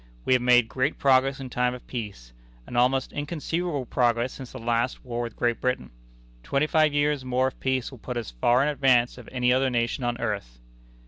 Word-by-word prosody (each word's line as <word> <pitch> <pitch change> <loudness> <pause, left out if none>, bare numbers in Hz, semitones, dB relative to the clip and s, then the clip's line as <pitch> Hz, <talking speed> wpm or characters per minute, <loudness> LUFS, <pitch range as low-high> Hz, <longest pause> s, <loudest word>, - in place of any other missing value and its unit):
We - - +3
have 125 - +3
made 125 -1 +5
great 130 +5 -1
progress 135 0 +3
in 130 -2 -7
time 125 0 0
of 125 - -12
peace 100 - -7 0.3
an - - -9
almost 130 +2 +2
inconceivable 155 0 -3
progress 120 0 +1
since 130 -2 -9
the - - -8
last 120 +2 -1
war 120 -1 -3
with 120 -2 -5
Great 120 -1 0
Britain. 125 - -1 0.5
Twenty 140 - 0
five 155 -1 +3
years 145 -1 +1
more 130 +1 +1
of - - -21
peace 130 -1 -1
will 130 - -12
put 125 +2 -5
us 120 - -4
far 120 - +3
in 150 - +1
advance 130 -4 +2
of 120 - -12
any 125 -1 +2
other 130 +1 +2
nation 120 +1 -1
on 120 0 -1
earth." 100 - -3
125 Hz, 205 wpm, -26 LUFS, 120-135 Hz, 0.5 s, made